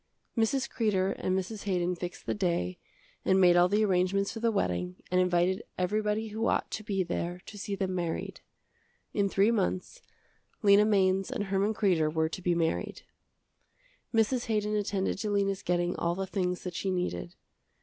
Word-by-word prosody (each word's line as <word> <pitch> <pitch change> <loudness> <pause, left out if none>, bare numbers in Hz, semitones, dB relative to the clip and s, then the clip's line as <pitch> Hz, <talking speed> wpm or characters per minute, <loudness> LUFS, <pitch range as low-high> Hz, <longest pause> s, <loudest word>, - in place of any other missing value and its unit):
Mrs. 245 +4 +1
Kreder 195 -4 +1
and 185 0 0
Mrs. 200 +3 -4
Haydon 180 -2 0
fixed 175 0 -7
the - - 0
day 170 - -1 0.4
and 190 0 +3
made 180 -2 +6
all 175 +1 +5
the 210 +2 +3
arrangements 195 +1 +1
for 225 - -6
the 230 0 +2
wedding 90 - -1 0.2
and 180 0 +4
invited 180 +1 +2 0.2
everybody 210 +3 0
who 220 +2 -1
ought - - 0
to 215 - -4
be 195 -2 0
there 175 0 -3
to - - -10
see 200 0 -4
them 190 -1 -2
married. 170 -3 -3 0.7
In 200 -1 +1
three 200 +4 +3
months 200 - -1 0.6
Lena 205 0 +6
Mainz 195 -2 +2
and 250 -5 -2
Herman 200 +2 0
Kreder 175 -8 +2
were 160 0 +1
to 185 - -6
be 175 -1 +1
married. 165 -1 -1 1.1
Mrs. 230 +2 +1
Haydon 210 -1 0
attended 200 -2 -1
to 210 - -2
Lena's 200 -1 0
getting 175 0 0
all 170 0 0
the 195 +1 -2
things 180 -2 -2
that 180 - -5
she 190 - -2
needed. 180 0 -2
190 Hz, 175 wpm, -29 LUFS, 180-210 Hz, 1.1 s, made